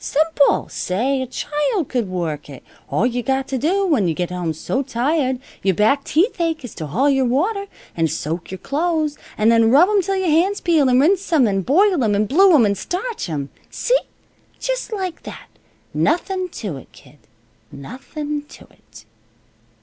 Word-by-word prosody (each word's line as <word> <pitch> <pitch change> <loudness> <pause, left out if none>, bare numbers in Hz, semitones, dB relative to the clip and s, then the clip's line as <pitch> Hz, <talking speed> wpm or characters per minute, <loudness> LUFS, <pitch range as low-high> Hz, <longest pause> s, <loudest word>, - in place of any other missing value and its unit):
Simple! 305 -1 +2
Say, 255 +9 -1
a 260 - -3
child 295 - -1
could 240 -7 -2
work 160 -5 -4
it. 135 - -11 0.3
All 210 - +1
you 245 0 0
got 265 +1 -1
to 265 - -1
do, 380 +8 +1
when 275 - +2
you 165 - -1
get 180 +1 -3
home 180 -2 -2
so 160 - -2
tired 265 +1 0 0.2
your 190 -2 +1
back 220 - +2
teeth 355 +4 +1
ache, 325 -5 -1
is 240 - -9
to 155 - -6
haul 240 - +1
your 270 -2 +3
water, 395 - 0 0.3
an' 165 -1 +1
soak 160 +3 -4
your 190 - -6
clothes, 310 - -1 0.2
an' 215 +1 +3
then 230 -1 +4
rub 300 - +6
'em 415 -2 +3
till 390 +2 -2
your 380 -1 -1
hands 365 +6 +2
peel, 315 -6 +3
and 250 0 +4
rinse 365 +6 +2
'em, 285 -8 +4
an' 195 -2 0
boil 355 - +3
'em, 210 -2 +2
and 210 +1 +1
blue 380 - +5
'em, 245 -7 +5
an' 200 - +2
starch 365 - -4
'em. 140 -3 -4 0.2
See? - - +1 0.6
Just - - -3
like 375 -5 -4
that. - - -10 0.4
Nothin' 370 +2 0
to 200 - -6
it, - - -14
kid. 150 - -19 0.5
Nothin' 290 - -6
to - - -13
it." 110 0 -18
270 Hz, 190 wpm, -20 LUFS, 205-340 Hz, 0.6 s, rub